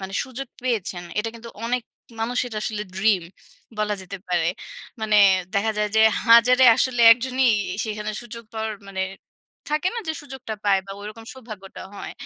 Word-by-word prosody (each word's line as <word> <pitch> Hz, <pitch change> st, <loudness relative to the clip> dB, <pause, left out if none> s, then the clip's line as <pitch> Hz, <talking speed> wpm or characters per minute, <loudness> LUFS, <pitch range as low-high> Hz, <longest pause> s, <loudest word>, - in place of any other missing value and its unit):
মানে 190 Hz, 0 st, -7 dB
সুযোগ 260 Hz, +1 st, -7 dB
পেয়েছেন। 205 Hz, -8 st, -2 dB, 0.2 s
এটা 225 Hz, +2 st, 0 dB
কিন্তু 230 Hz, 0 st, -10 dB, 0.2 s
অনেক 245 Hz, +1 st, 0 dB, 0.4 s
মানুষের 245 Hz, +1 st, -1 dB
আসলে 210 Hz, -1 st, -3 dB
ড্রিম 190 Hz, -1 st, +2 dB, 0.6 s
বলা 210 Hz, 0 st, 0 dB
যেতে 190 Hz, +2 st, -7 dB
পারে। 175 Hz, -2 st, +1 dB, 0.5 s
মানে 215 Hz, -1 st, +2 dB, 0.4 s
দেখা 210 Hz, +2 st, +2 dB
যায় 210 Hz, -, +1 dB
যে -, -, +6 dB, 0.3 s
হাজারে 245 Hz, +3 st, +7 dB
আসলে 250 Hz, -2 st, +1 dB
একজনই 255 Hz, +2 st, 0 dB, 0.4 s
সেখানে 215 Hz, -1 st, -4 dB
সুযোগ 235 Hz, -1 st, -9 dB
পাওয়ার 220 Hz, 0 st, -3 dB, 0.2 s
মানে 190 Hz, -1 st, -4 dB, 0.7 s
থাকে 305 Hz, +4 st, +1 dB
না 470 Hz, -, -2 dB
যে 320 Hz, -, +1 dB
সুযোগটা 265 Hz, -6 st, -7 dB
পায় 195 Hz, -1 st, +4 dB
বা 195 Hz, -, -9 dB
ঐরকম 215 Hz, +2 st, -9 dB
সৌভাগ্যটা 215 Hz, -7 st, -10 dB
হয়। -, -, -7 dB
220 Hz, 155 wpm, -23 LUFS, 210-250 Hz, 0.7 s, হাজারে